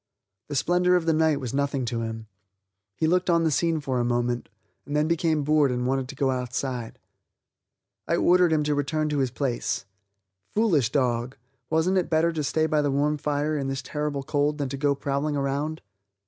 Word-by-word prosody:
The 145 - -5
splendor 180 +5 +3
of 175 -2 +1
the 165 - +3
night 155 -2 +2
was 125 -3 -5
nothing 140 -2 0
to 115 0 -2
him; 110 0 -5 0.7
he 160 - 0
looked 180 +3 +2
on 170 -1 +3
the 160 - +2
scene 165 +2 +1
for 130 -4 -2
a - - +1
moment, 120 0 -1 0.3
and 145 - -5
then 150 +1 +2
became 160 -2 +1
bored 150 -1 +3
and 125 0 -1
wanted 135 0 0
to 140 - -7
go 135 -1 +1
outside. 125 -1 -3 1.1
I - - +2
ordered 180 -1 +4
him 155 -1 +2
to 150 0 +1
return 155 +2 -1
to 145 -1 0
his 130 -2 +1
place. 125 -5 -2 0.7
Foolish 165 - +2
dog, 125 -2 0 0.3
wasn't 165 +4 +2
it 180 - -3
better 165 +1 +3
to 155 -2 -2
stay 155 +3 +1
by 155 -1 +2
the 145 - 0
warm 145 +2 +1
fire 150 +1 -1
in 140 -2 -2
this 135 0 -3
terrible 150 -2 -3
cold 145 +1 0
than 140 -3 -2
to 140 - -4
go 140 0 +1
prowling 140 +2 -1
around. 140 +3 -2
145 Hz, 200 wpm, -25 LUFS, 135-155 Hz, 1.1 s, ordered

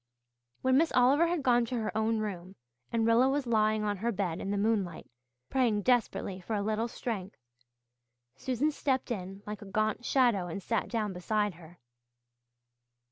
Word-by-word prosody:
When 260 0 +4
Miss 320 +2 +3
Oliver 275 +7 +5
had 335 -4 -1
gone 245 -2 +4
to 245 - -4
her 220 -2 -2
own 220 +1 +1
room 190 -3 -5 0.4
and 230 -1 +1
Rilla 235 +3 +4
was 280 0 0
lying 215 -2 +2
on 205 -1 -1
her 230 +5 -1
bed 185 -5 -2
in 195 - -4
the 205 - 0
moonlight, 200 -4 0 0.5
praying 230 -6 +2
desperately 195 -6 0
for 215 +5 -3
a 200 - -1
little 220 +2 0
strength, 210 -5 -5 1.0
Susan 260 - 0
stepped 265 -3 -1
in 195 -2 -5
like 210 0 -6
a - - -9
gaunt 215 +3 -1
shadow 240 -9 +2
and 180 +3 -6
sat 225 +1 -1
down 215 -4 -1
beside 205 +3 0
her. 170 0 -15
215 Hz, 170 wpm, -30 LUFS, 200-245 Hz, 1.0 s, Oliver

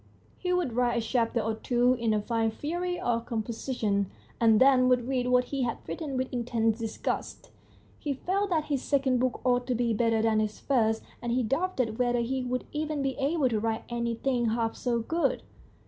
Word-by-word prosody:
He 360 - -1
would 360 -9 0
write 240 0 +1
a 230 - -1
chapter 235 -1 +1
or 220 +1 -1
two 245 +2 +2
in 235 -3 0
a 215 - +2
fine 225 +1 0
fury 350 +9 -3
of 235 -1 -1
composition, 220 -3 -1 0.3
and 225 -2 +5
then 260 -1 +5
would 250 -1 +2
read 255 -2 0
what 250 0 +4
he 275 - 0
had 240 -2 -1
written 290 -5 -4
with 260 0 -2
intense 230 -2 0
disgust. 225 -1 -4 0.5
He 290 - -2
felt 390 +8 -1
that 320 -4 +1
his 285 -4 -1
second 270 -3 +1
book 255 0 0
ought 245 0 +2
to 250 - +1
be 235 -1 +1
better 225 0 +2
than 220 -1 +3
his 215 0 -2
first, 225 -5 +1 0.2
and 240 - -2
he 250 +1 +1
doubted 255 -3 -1
whether 245 -1 +2
he 260 +3 -1
would 250 0 -2
even 305 -1 -2
be 270 -1 -1
able 285 0 +2
to 220 -3 0
write 225 0 -1
anything 240 +1 -1
half 225 0 0
so 245 -2 -1
good. 330 +9 0
245 Hz, 195 wpm, -28 LUFS, 225-270 Hz, 0.5 s, and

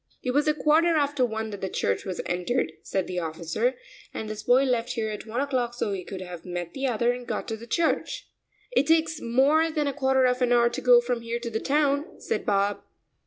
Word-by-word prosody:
"It 250 - 0
was 290 +3 +2
a 305 - +3
quarter 320 +3 +3
after 290 -3 +1
one 220 -2 -2
that 205 - -7
the 190 - -2
church 100 - -1
was 185 -2 -3
entered," 180 +8 -1
said 190 -2 -2
the 180 -1 -3
officer, 170 +9 -1 0.4
"and 220 - -5
this 215 0 -5
boy 250 +2 +4
left 245 -3 0
here 225 -2 -2
at 210 +1 -7
one 230 +3 -3
o'clock 255 -4 -1
so 210 -4 -1
he 190 -2 -4
could 185 +1 -7
have 180 -2 -8
met 175 -1 -5
the 270 0 -1
other 235 0 +2
and 245 0 -8
got - - -3
to 225 - -2
the 230 +2 -11
church." 335 +7 -1 0.4
"It 290 - +2
takes 320 -1 +2
more 280 +7 +3
than 305 -2 -1
a 280 - -1
quarter 265 -1 +2
of 250 0 +1
an 245 -1 +2
hour 235 0 +5
to - - -4
go 245 -1 +7
from 240 -1 -2
here 230 0 -3
to 235 -1 -4
the 220 - -1
town," 285 +2 0
said 460 - -3
Bob. 200 0 +1
240 Hz, 235 wpm, -26 LUFS, 215-280 Hz, 0.4 s, go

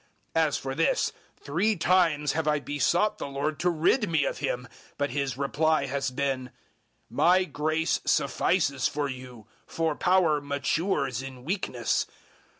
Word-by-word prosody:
012:008 160 -1 +4
As 145 - -1
for 135 0 -4
this, 165 +4 +1 0.3
three 190 +10 0
times 165 -5 +2
have 160 0 -2
I 150 -1 +2
besought 170 +9 +1
the - - -4
Lord 140 +2 -2
to 180 - +2
rid 175 +7 +2
me 155 -4 +2
of - - -3
him; 125 - -1
012:009 - - -14 0.3
but 145 0 0
His 135 -2 -2
reply 150 +1 +1
has 135 0 -2
been, 130 -1 -2 0.6
"My 185 +2 +4
grace 160 -1 0
suffices 140 0 +1
for 145 0 -2
you, 125 -4 -9 0.2
for 165 -2 -1
power 175 -5 +3
matures 140 - -1
in 130 -2 -9
weakness." 145 - -1
145 Hz, 150 wpm, -27 LUFS, 135-165 Hz, 0.6 s, 012:008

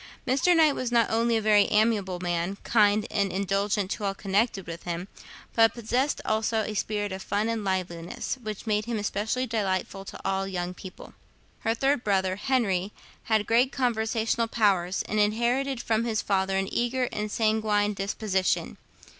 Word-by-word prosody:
Mr. 275 +8 +3
Knight 310 -3 +5
was 250 -3 -3
not 235 -1 +3
only 230 +1 +2
a - - -1
very 210 -1 +5
amiable 210 -4 +1
man, 175 +2 -2
kind 210 -2 +3
and 200 -2 0
indulgent 200 +1 0
to - - -3
all 195 -1 -1
connected 195 +1 0
with 170 0 -7
him, 175 +1 -4 0.5
but 225 -1 +4
possessed 245 +5 0
also 220 +1 +1
a 215 - -4
spirit 205 -1 -2
of 190 0 -5
fun 205 +3 -1
and 230 -2 -2
liveliness, 180 -1 -3
which 215 -2 -6
made 210 -1 0
him 235 -1 -2
especially 215 +4 -1
delightful 195 -4 -2
to - - -9
all 195 0 0
young 180 -1 -3
people. 185 0 -11 0.5
Her 225 0 0
third 270 +1 +1
brother, 190 -2 +1
Henry, 205 -6 0 0.3
had 220 -2 +2
great 245 +3 +3
conversational 230 -2 0
powers, 195 -5 +1
and 215 - -2
inherited 240 +5 +1
from 225 0 +1
his 220 -2 0
father 190 -1 +1
an 195 0 -2
eager 245 +1 0
and 210 0 -3
sanguine 215 -2 +1
disposition. 195 -1 -1
210 Hz, 165 wpm, -27 LUFS, 195-230 Hz, 0.5 s, Knight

